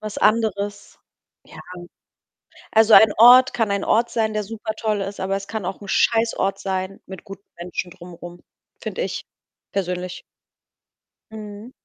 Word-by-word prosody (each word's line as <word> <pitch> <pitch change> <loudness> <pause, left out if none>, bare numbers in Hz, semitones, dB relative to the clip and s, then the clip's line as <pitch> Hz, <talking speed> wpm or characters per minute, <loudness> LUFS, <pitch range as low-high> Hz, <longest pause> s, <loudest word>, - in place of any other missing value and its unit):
Was 215 -1 -6
anderes. 205 -2 0 0.5
Ja. - - -15 1.1
Also, 220 0 +6
ein 220 -1 +8
Ort 250 +3 +8
kann 225 -4 0
ein 200 0 -1
Ort 235 +2 +2
sein, 220 -2 0
der 215 0 -1
supertoll 215 0 -3
ist, 195 0 -5
aber 195 +1 -1
es 195 0 -6
kann 220 -4 -4
auch 195 - -5
'n 200 - -11
Scheißort 225 -3 +1
sein 190 0 -4
mit 190 0 -10
guten 195 -1 -11 0.2
Menschen 180 0 -5
drum 175 -1 -12
rum. 175 +1 -11 0.4
Finde - - -4
ich - - -4 0.5
persönlich. 180 -1 -3 1.1
Mhm. 215 +2 -9
205 Hz, 145 wpm, -22 LUFS, 190-220 Hz, 1.1 s, ein